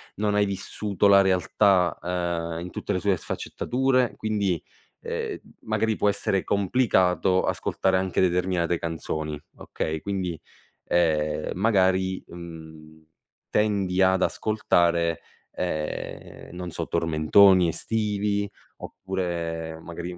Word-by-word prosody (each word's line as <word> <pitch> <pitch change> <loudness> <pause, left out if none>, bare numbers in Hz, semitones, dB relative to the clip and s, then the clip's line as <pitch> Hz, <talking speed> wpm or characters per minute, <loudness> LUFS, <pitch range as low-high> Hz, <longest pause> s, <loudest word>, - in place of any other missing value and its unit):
non 105 0 0
hai 105 0 +3
vissuto 100 0 -1
la 100 0 +7
realtà, 95 -1 +2
uhm, 85 -1 -2
in 90 - -6
tutte - - -3
le 90 - 0
sue 100 -1 +1
sfaccettature, 130 +6 0
quindi, 100 -6 -1 0.4
ehm, - - -3
m - - -32 0.2
magari 110 -1 +1
può - - +1
essere 100 -1 0
complicato 95 -3 +2
ascoltare 95 -1 0
anche 95 0 0
determinate 90 -1 +1
canzoni, 80 -2 -4 0.2
okay, 80 0 -4
quindi, 90 -3 -3 0.5
ehm, 75 -3 +1
magari, 95 -2 +2
mhmm, 80 -2 -11 0.4
tendi 100 -3 +1
ad 95 0 +4
ascoltare, 85 -6 +1 0.3
ehm, 80 -4 -5
non 90 0 -5
so, - - -4
tormentoni 85 +3 +4
estivi 100 +2 -1 0.3
oppure 85 -4 -4
magari 85 +1 -7
90 Hz, 110 wpm, -25 LUFS, 85-100 Hz, 0.5 s, la